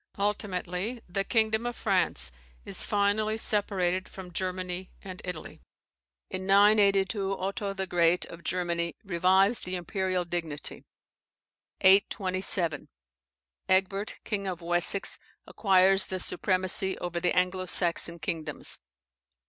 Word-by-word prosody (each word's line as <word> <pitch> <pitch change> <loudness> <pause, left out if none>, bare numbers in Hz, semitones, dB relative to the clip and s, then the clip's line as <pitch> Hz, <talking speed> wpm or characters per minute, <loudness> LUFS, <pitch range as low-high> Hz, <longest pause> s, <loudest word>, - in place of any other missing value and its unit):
Ultimately, 200 +1 -2
the 195 +2 -1
kingdom 220 +2 +1
of 240 - -4
France 190 - 0 0.3
is - - -1
finally 210 +2 +1
separated 190 -4 +1
from 180 -2 -10
Germany 185 0 -3
and 185 -1 -8
Italy. 180 -3 -7 0.7
In 185 0 -4
982, 200 -1 +3
Otho 200 +1 -3
the 190 -1 -3
Great, 175 -1 +2
of 170 0 -12
Germany, 170 -1 -1
revives 190 +3 +3
the 180 +1 -5
imperial 185 0 -2
dignity. 165 -4 -5 1.0
827. 185 -4 +3 0.8
Egbert, 195 +2 +2
king 200 -3 -3
of 180 -2 -5
Wessex, 175 +3 +1 0.3
acquires 195 -1 +4
the 185 - -3
supremacy 185 +1 +1
over 175 -1 -3
the 175 +1 0
Anglo 185 0 +1
Saxon 170 -1 +2
kingdoms. 155 -3 -3
185 Hz, 110 wpm, -28 LUFS, 180-200 Hz, 1.0 s, acquires